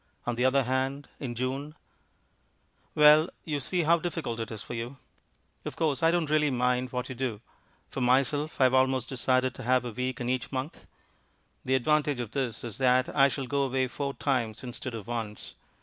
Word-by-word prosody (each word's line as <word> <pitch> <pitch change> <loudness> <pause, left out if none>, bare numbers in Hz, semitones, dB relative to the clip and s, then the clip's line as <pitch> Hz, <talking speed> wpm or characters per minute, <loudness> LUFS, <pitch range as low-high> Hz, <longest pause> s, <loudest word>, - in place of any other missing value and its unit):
On 120 - 0
the 120 +2 0
other 135 +1 +4
hand, 130 +3 -1
in 125 -4 -4
June 135 +5 -3 1.2
Well, 150 +2 +7
you 150 -3 -2
see 175 +6 0
how 170 +2 +4
difficult 160 -9 -3
it 115 0 -3
is 110 -3 -7
for - - -7
you. 120 +3 -5 0.7
Of - - -6
course, 155 -2 0
I 165 - +5
don't 165 -3 +1
really 150 -1 +3
mind 125 0 0
what 125 -1 -3
you - - -5
do. 120 -4 -3 0.5
For 135 - -5
myself 140 +5 +1
I - - +5
have 130 0 +4
almost 130 -1 +2
decided 130 0 +1
to - - -9
have 125 +1 +2
a 120 - -4
week 125 +2 -3
in 120 - -3
each 125 0 -1
month. 130 +4 -5 0.8
The 130 - +2
advantage 145 +1 +2
of 120 -3 -4
this 125 -5 -2
is 115 -2 -6
that 130 -1 +3
I 135 -1 +6
shall 135 -1 -4
go 140 +2 0
away 130 -1 +1
four 140 +2 -4
times 125 -5 -1
instead 125 0 -5
of 110 - -7
once. 115 -3 -5
130 Hz, 195 wpm, -28 LUFS, 125-140 Hz, 1.2 s, Well